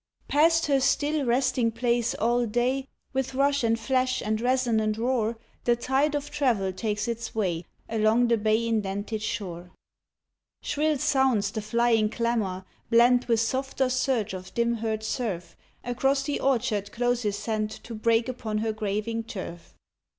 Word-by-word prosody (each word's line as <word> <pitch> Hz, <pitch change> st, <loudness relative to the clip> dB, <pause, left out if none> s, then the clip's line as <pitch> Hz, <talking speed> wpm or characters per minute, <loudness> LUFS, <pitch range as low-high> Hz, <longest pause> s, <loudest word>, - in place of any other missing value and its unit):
Past 325 Hz, +3 st, +4 dB
her 280 Hz, -2 st, +3 dB
still 290 Hz, +2 st, +1 dB
resting 245 Hz, -1 st, +2 dB
place 235 Hz, 0 st, 0 dB
all 240 Hz, +2 st, +1 dB
day, 255 Hz, +4 st, 0 dB, 0.3 s
With 265 Hz, 0 st, -2 dB
rush 280 Hz, 0 st, +2 dB
and 230 Hz, 0 st, +2 dB
flash 255 Hz, +1 st, +1 dB
and 215 Hz, +1 st, -1 dB
resonant 235 Hz, -4 st, +1 dB
roar, 235 Hz, -1 st, 0 dB, 0.3 s
The 240 Hz, -, +4 dB
tide 270 Hz, +5 st, +1 dB
of 290 Hz, 0 st, -3 dB
travel 220 Hz, -10 st, +1 dB
takes 210 Hz, +2 st, -2 dB
its 235 Hz, -1 st, -4 dB
way 180 Hz, -6 st, -1 dB, 0.2 s
Along 225 Hz, +2 st, +3 dB
the 235 Hz, -1 st, +2 dB
bay 220 Hz, +2 st, +1 dB
indented 210 Hz, 0 st, -2 dB
shore. 180 Hz, -5 st, -5 dB, 0.9 s
Shrill 305 Hz, 0 st, +1 dB
sounds 260 Hz, -7 st, +2 dB
the 215 Hz, -, -3 dB
flying 225 Hz, 0 st, +2 dB
clamor, 220 Hz, -6 st, -1 dB, 0.2 s
blent 245 Hz, +1 st, +5 dB
With 230 Hz, -2 st, +3 dB
softer 265 Hz, +2 st, 0 dB
surge 255 Hz, -5 st, 0 dB
of 185 Hz, 0 st, -7 dB
dim 235 Hz, 0 st, +2 dB
heard 220 Hz, -1 st, -2 dB
surf. 215 Hz, -6 st, -3 dB, 0.3 s
Across 270 Hz, +3 st, +1 dB
the 290 Hz, +1 st, -2 dB
orchard 230 Hz, -6 st, 0 dB
closes 240 Hz, -4 st, 0 dB
sent 215 Hz, 0 st, -2 dB
To 225 Hz, +2 st, -9 dB
break 230 Hz, +1 st, +2 dB
upon 230 Hz, -4 st, -3 dB
her 220 Hz, 0 st, -1 dB
graving 215 Hz, +2 st, -2 dB
turf. 175 Hz, -6 st, -8 dB
230 Hz, 150 wpm, -26 LUFS, 215-255 Hz, 0.9 s, blent